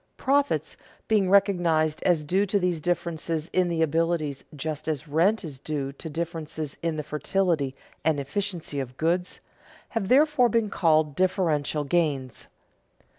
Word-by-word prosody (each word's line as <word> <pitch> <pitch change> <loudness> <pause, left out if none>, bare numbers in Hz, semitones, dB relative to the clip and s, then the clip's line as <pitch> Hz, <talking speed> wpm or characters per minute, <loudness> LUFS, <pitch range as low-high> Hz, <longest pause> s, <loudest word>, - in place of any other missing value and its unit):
Profits, 280 +1 +1 0.3
being 205 -4 +3
recognized 175 -6 +3
as 170 -4 +2
due 190 +7 +1
to 200 - +1
these 180 -4 0
differences 170 -2 -2
in 185 -1 +3
the 165 -2 +1
abilities 160 -2 0
just 155 +1 -4
as 155 -1 -2
rent 180 +9 +2
is 145 -6 -7
due 140 -2 -3
to 150 +4 -9
differences 160 -2 -4
in 165 -1 -1
the 150 - -3
fertility 150 -2 0 0.3
and 155 -1 +2
efficiency 165 0 -3
of 130 -1 -6
goods, 175 +3 -1 0.5
have 225 -5 -2
therefore 275 0 +4
been 225 -2 +1
called 155 -5 +3
differential 160 -5 +1
gains. 145 -5 -1
165 Hz, 140 wpm, -26 LUFS, 150-185 Hz, 0.5 s, therefore